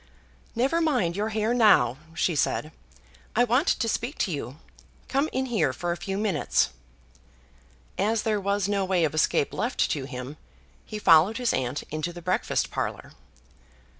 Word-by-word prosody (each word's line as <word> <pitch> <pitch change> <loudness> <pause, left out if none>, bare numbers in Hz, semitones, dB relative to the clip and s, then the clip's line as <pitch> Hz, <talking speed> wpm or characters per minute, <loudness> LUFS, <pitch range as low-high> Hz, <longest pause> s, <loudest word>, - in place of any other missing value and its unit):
"Never 270 +8 +1
mind 245 - +1
your 210 +2 -1
hair 220 +1 0
now," 210 - +4 0.2
she 170 - +1
said. 155 +1 0 0.6
"I 245 - +5
want 250 - +2
to 230 - +1
speak 240 +5 -2
to 185 - -4
you. 140 -3 -5 0.5
Come 280 +3 0
in 260 0 -1
here 240 -4 +1
for 175 -1 -3
a - - -1
few 195 +3 -4
minutes." 210 -2 +1 1.3
As 215 +3 +1
there 215 -2 0
was 200 0 0
no 200 -1 0
way 185 -2 +1
of 155 - 0
escape 155 -2 +1
left 240 +3 0
to 140 -3 -2
him, 130 +2 -7 0.5
he 215 - -5
followed 185 +2 +5
his 245 -2 0
aunt 130 +3 -2
into 155 +3 -3
the 175 0 -10
breakfast 185 +2 0
parlour. - - -4
200 Hz, 165 wpm, -26 LUFS, 160-230 Hz, 1.3 s, I